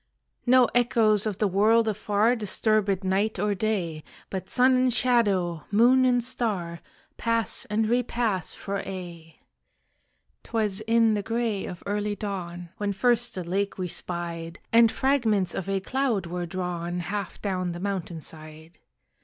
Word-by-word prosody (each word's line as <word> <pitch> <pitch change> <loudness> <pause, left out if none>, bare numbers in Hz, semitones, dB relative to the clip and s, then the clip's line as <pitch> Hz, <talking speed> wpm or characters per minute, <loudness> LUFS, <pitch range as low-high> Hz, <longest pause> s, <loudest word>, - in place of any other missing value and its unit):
No 255 0 +6
echoes 225 -3 +3
of 205 -3 -3
the 210 - +2
world 220 +4 +3
afar 215 +2 +1
Disturb 215 -1 +1
it 195 0 0
night 195 +3 0
or 205 +2 +1
day, 185 -7 -2 0.3
But 190 -1 -5
sun 255 +1 +4
and 255 0 +3
shadow, 200 -10 +1
moon 245 +5 +5
and 245 -1 +3
star, 200 -9 -2 0.4
Pass 230 -1 0
and 215 +1 0
repass 235 -5 0
for 200 0 -4
aye. 175 -4 -8 1.1
'Twas 215 -3 -1
in 225 -1 +4
the 205 - 0
gray 225 -2 -2
of 180 - -8
early 205 0 -1
dawn 180 -4 -5
When 205 -1 -1
first 240 +3 +1
the 185 - -3
lake 195 +4 -2
we 185 -1 -2
spied, 170 -1 -5 0.2
And 230 -1 +6
fragments 230 -9 +1
of 195 - -4
a 195 0 +1
cloud 240 -2 -1
were 175 +1 -4
drawn 175 0 -3
Half 200 +1 -4
down 185 -3 -1
the 175 - -7
mountain 185 -4 -3
side. 155 +2 -11
205 Hz, 150 wpm, -26 LUFS, 180-230 Hz, 1.1 s, No